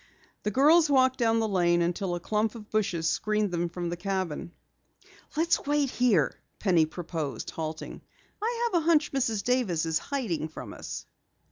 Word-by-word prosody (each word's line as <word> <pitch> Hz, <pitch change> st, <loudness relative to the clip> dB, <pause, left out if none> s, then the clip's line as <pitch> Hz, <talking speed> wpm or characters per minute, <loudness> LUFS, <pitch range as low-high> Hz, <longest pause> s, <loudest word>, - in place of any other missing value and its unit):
The 210 Hz, -, -1 dB
girls 305 Hz, -, +5 dB
walked 260 Hz, -2 st, +3 dB
down 225 Hz, -1 st, +3 dB
the 220 Hz, -, +1 dB
lane 175 Hz, -3 st, +2 dB
until 175 Hz, +1 st, -1 dB
a -, -, -3 dB
clump 215 Hz, +4 st, -1 dB
of 215 Hz, -2 st, -11 dB
bushes 180 Hz, -7 st, 0 dB
screened 210 Hz, +3 st, 0 dB
them 175 Hz, 0 st, -1 dB
from 175 Hz, 0 st, -4 dB
the -, -, -2 dB
cabin. 185 Hz, -4 st, -3 dB, 0.9 s
"Let's 335 Hz, +2 st, +2 dB
wait 290 Hz, -2 st, +2 dB
here," 215 Hz, -, +3 dB, 0.2 s
Penny 175 Hz, -6 st, +3 dB
proposed, 160 Hz, -3 st, -5 dB
halting. 160 Hz, -1 st, -5 dB, 0.4 s
"I 470 Hz, +2 st, 0 dB
have 345 Hz, -, +3 dB
a -, -, -8 dB
hunch 315 Hz, -2 st, +3 dB
Mrs. 225 Hz, -7 st, 0 dB
Davis 230 Hz, -11 st, +1 dB
is 160 Hz, -1 st, +1 dB
hiding 225 Hz, -, -2 dB
from 155 Hz, -, -9 dB
us." -, -, -7 dB
210 Hz, 165 wpm, -28 LUFS, 175-260 Hz, 0.9 s, girls